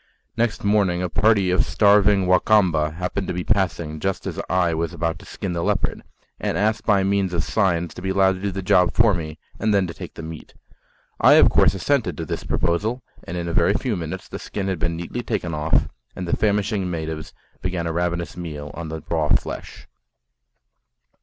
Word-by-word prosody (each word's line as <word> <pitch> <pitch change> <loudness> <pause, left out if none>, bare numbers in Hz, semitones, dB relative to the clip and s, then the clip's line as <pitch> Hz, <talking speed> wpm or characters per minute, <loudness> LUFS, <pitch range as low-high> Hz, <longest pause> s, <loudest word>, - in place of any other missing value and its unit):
Next 115 -1 0
morning 100 -4 +2
a 90 - -1
party 100 -2 +3
of 90 - +3
starving 100 +3 +4
Wa 90 0 +5
Kamba 90 -8 +3
happened 90 +3 -3
to - - -3
be 90 - -2
passing 85 -6 0
just 95 +3 -2
as - - -3
I 90 -2 +2
was 80 0 -2
about 85 -1 -2
to - - -14
skin 95 - -4
the 85 - -2
leopard, - - 0 0.4
and - - -1
asked 110 +2 0
by 100 -3 +4
means 95 -1 +1
of 85 - 0
signs 85 -5 0
to - - -9
be 95 - -3
allowed 95 0 +4
to 95 - -8
do 100 0 -1
the 95 0 -5
job 90 -1 +3
for 110 -2 +4
me 80 -3 -4 0.2
and 105 -1 +2
then 100 -2 +3
to 85 - -6
take - - -9
the 80 - -8
meat. 80 -1 -9 0.6
I - - +7
of - - +6
course - - +4
assented 125 +5 0
to 80 - -4
this - - -4
proposal, 110 +9 -1 0.2
and 90 - -5
in 85 -1 -3
a 85 - -3
very 90 +5 +3
few 125 -3 -1
minutes 80 -3 -5
the - - -7
skin 95 -1 -4
had 95 -4 -2
been 85 +1 -1
neatly 85 +8 -4
taken 105 -8 -3
off, 75 +1 +1 0.3
and 90 - -5
the - - +1
famishing 105 -2 0
natives 80 -2 -4 0.3
began 90 -2 -2
a 85 - -2
ravenous 85 -1 -2
meal 75 -5 -6
on 85 -2 -6
the 80 0 -6
raw 80 -3 0
flesh. - - -2
90 Hz, 210 wpm, -22 LUFS, 85-100 Hz, 0.6 s, I